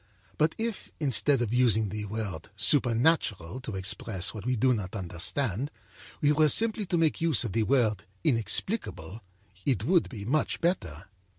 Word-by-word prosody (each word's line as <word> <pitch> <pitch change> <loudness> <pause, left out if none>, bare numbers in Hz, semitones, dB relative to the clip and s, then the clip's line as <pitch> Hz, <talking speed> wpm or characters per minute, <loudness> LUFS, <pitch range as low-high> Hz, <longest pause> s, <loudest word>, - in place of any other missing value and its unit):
But 155 +1 +2
if, 225 -2 -4
instead 140 -2 +3
of 115 -1 -3
using 110 -4 +3
the 105 +1 -5
word 100 -6 -5
'supernatural' 120 - +2
to 115 -5 -6
express 95 0 0
what 110 +1 -7
we 125 - +1
do 125 +3 +3
not 105 -3 -4
understand, 100 - -2 0.5
we 145 -1 +4
were 155 0 +4
simply 220 +2 +2
to 175 - 0
make 160 -2 +1
use 160 -9 +3
of 115 - -4
the 115 - +1
word 110 -4 +1 0.2
'inexplicable,' 115 - -1 0.4
it 130 -6 0
would 170 +6 +2
be 105 -5 -8
much 150 +7 0
better. 95 - -2
120 Hz, 160 wpm, -28 LUFS, 105-150 Hz, 0.5 s, we